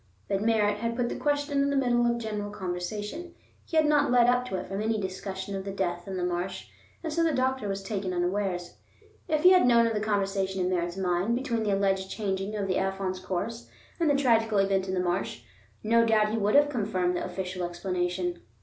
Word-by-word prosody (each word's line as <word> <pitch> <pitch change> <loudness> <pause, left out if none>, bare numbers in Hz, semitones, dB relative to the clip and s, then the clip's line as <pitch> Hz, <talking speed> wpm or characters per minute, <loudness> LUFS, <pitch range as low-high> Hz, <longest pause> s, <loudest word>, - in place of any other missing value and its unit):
But 195 0 0
Merritt 210 -2 +2
had 230 +1 -2
put 240 0 0
the - - -3
question 290 -1 0
in 280 - +2
the 280 - 0
middle 240 -3 +2
of 235 0 +1
general 210 -3 -4
conversation; 205 - -5 0.3
he 325 - -3
had 310 - +5
not 295 -2 +3
led 245 -1 +5
up 245 +1 +3
to 190 - -3
it - - -3
from 195 +2 -4
any 220 0 0
discussion 190 0 -5
of 190 - -4
the 200 - -5
death 175 -2 -2
in 190 -1 -4
the 180 - -2
marsh, 180 +1 -3 0.3
and 320 -2 -3
so 335 +1 +2
the 330 - +3
doctor 260 -4 0
was 195 0 -3
taken 195 -2 -3
unawares. 180 0 -2 0.5
If 310 -2 0
he 365 - +9
had 365 -8 +6
known 235 -1 +5
of 230 - 0
the 210 - 0
connection 195 -2 -1
in 180 0 0
Merritt's 175 0 -1
mind 185 +4 +1
between 240 -3 -1
the 205 -2 +1
alleged 195 -1 0
changing 195 0 -3
of 200 -2 -2
the 185 - 0
Afon's 190 -1 -2
course 200 +6 -4 0.3
and 330 -2 +2
the 285 - +4
tragical 225 -6 +3
event 195 -1 +2
in 190 - -1
the - - 0
marsh, 175 -8 -2 0.4
no 230 +2 +4
doubt 215 -2 +3
he 225 - -1
would 210 +3 +2
have 290 0 +6
confirmed 190 -7 0
the - - -2
official 180 0 -4
explanation. 180 - -2
205 Hz, 220 wpm, -28 LUFS, 185-235 Hz, 0.5 s, he